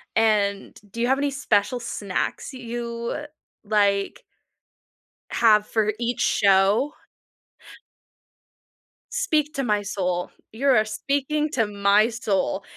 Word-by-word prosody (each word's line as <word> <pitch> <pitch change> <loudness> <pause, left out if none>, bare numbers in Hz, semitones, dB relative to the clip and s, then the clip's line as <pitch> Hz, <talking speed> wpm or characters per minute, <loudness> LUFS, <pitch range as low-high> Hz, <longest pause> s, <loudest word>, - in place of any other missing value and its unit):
and 210 -3 +1
do 230 - -8
you 240 - +1
have 265 +1 +3
any 285 0 0
special 245 -3 0
snacks 210 +2 -4
you, 235 -1 -5
uh, 295 - -6 0.4
like 200 -2 +1 1.1
have 215 -2 +4
for 215 -1 0
each 240 +1 -1
show? 200 +8 +3 2.2
Speak 310 -12 0
to 275 - -1
my 210 -3 +1
soul. 180 -3 -2 0.2
You 260 +6 -2
are 220 -5 +4
speaking 285 +7 -1
to 225 -4 +1
my 205 +2 +3
soul. 200 -3 -1
225 Hz, 115 wpm, -24 LUFS, 205-260 Hz, 2.2 s, have